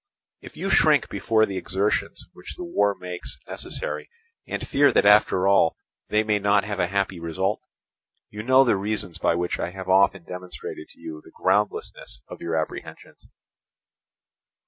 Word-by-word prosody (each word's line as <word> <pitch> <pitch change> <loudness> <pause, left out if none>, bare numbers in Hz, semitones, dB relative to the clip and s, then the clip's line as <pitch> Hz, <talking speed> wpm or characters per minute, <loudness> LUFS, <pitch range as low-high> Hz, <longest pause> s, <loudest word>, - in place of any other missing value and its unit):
"If - - -13
you - - -2
shrink - - +4
before 110 -1 +2
the 95 -2 -5
exertions 95 +3 -1
which 90 - -10
the 180 - -7
war 105 - +1
makes 90 -1 -5
necessary, - - -4 0.4
and - - -4
fear 145 +1 +4
that - - +3
after 100 -2 +5
all 100 -4 +4 0.3
they 105 +1 +2
may 105 -1 +1
not 100 0 +3
have 100 -1 -4
a 90 - +2
happy 95 -1 -1
result, 95 +5 -2 0.7
you 105 - -6
know 130 +4 +5
the 120 - +3
reasons 100 -4 -2
by 85 - +2
which 90 +1 -2
I - - -2
have 95 0 -8
often 95 -1 +4
demonstrated 90 -3 -8
to - - -17
you 80 -2 -8
the - - -15
groundlessness 100 -11 -1
of - - -10
your 85 -1 -2
apprehensions. 80 -1 -6
95 Hz, 165 wpm, -24 LUFS, 90-105 Hz, 0.7 s, after